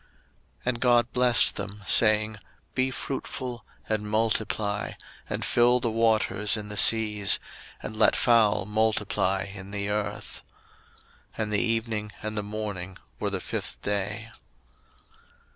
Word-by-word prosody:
01:001:022 - - -32 0.6
And 125 -1 0
God 120 -1 +3
blessed 125 -1 +4
them, 105 +1 -6
saying, 110 -1 +3 0.3
Be 130 +1 +1
fruitful, 130 -2 -5 0.2
and 105 -1 -1
multiply, 110 -1 0 0.4
and - - -2
fill 120 +1 +4
the 115 -2 -1
waters 110 -1 +2
in 105 -1 -6
the 105 - -6
seas, 105 -2 +3 0.4
and 110 - -5
let 110 - +4
fowl 110 -6 +4
multiply 105 -3 +1
in 100 -1 -9
the 100 0 -3
earth. 105 0 -3 1.0
01:001:023 - - 0
And 105 0 -4
the 105 - +3
evening 115 -2 -1
and 110 0 -3
the 105 - 0
morning 100 -3 -5 0.2
were - - 0
the - - -2
fifth - - -5
day. 105 +3 -2
110 Hz, 135 wpm, -27 LUFS, 105-115 Hz, 1.0 s, blessed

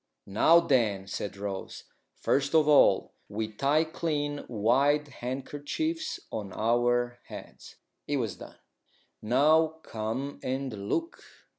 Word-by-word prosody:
"Now, 160 +12 +5
then," 115 - +1
said 100 +1 -5
Rose, 100 -1 -5 0.3
"first 140 +3 0
of 155 -2 +5
all, 150 -1 +5 0.2
we 110 +1 -3
tie 140 +7 +2
clean 150 -3 -2
white 135 +7 +2
handkerchiefs 145 - -4
on 100 -3 -5
our 120 +2 +1
heads." - - -11 0.3
It 145 - 0
was 115 -6 -2
done. - - -11 0.7
"Now, 155 +7 +3
come 115 +6 -4
and 130 -6 -4
look." 335 +1 -2
130 Hz, 115 wpm, -28 LUFS, 110-150 Hz, 0.7 s, Now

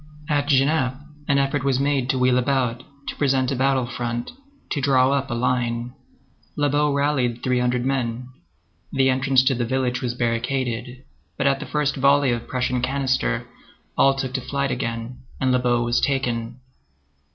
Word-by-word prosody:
At 145 -2 0
Genappe, 135 -2 +2 0.3
an 140 - +3
effort 140 0 0
was 135 -2 +1
made 140 -2 0
to 130 - +1
wheel 125 0 +3
about, 125 -2 0 0.3
to - - -4
present 135 -2 +1
a - - 0
battle 130 0 +2
front, 120 -1 -4 0.4
to 145 - -1
draw 130 -1 +3
up 140 -1 0
in 120 - -2
line. 120 -1 -1 0.6
Lobau 145 0 +2
rallied 140 -4 0
three 125 -1 +1
hundred 125 0 0
men. 125 -2 -2 0.6
The 135 -1 +3
entrance 130 0 +3
to 135 +1 +3
the 120 -1 -1
village 125 0 -1
was 120 -2 -2
barricaded, 125 +1 -2 0.3
but - - -1
at 135 0 +3
the 150 - -7
first 150 -1 0
volley 140 0 +4
of 120 -1 -3
Prussian 125 -1 -1
canister, 130 -2 0 0.5
all 135 0 +4
took 130 -1 -3
to 130 - -1
flight 140 0 -2
again, 115 -1 -4 0.2
and 130 -1 +1
Lobau 125 -1 +2
was 120 0 +1
taken. 120 -4 -1
130 Hz, 165 wpm, -23 LUFS, 125-135 Hz, 0.6 s, volley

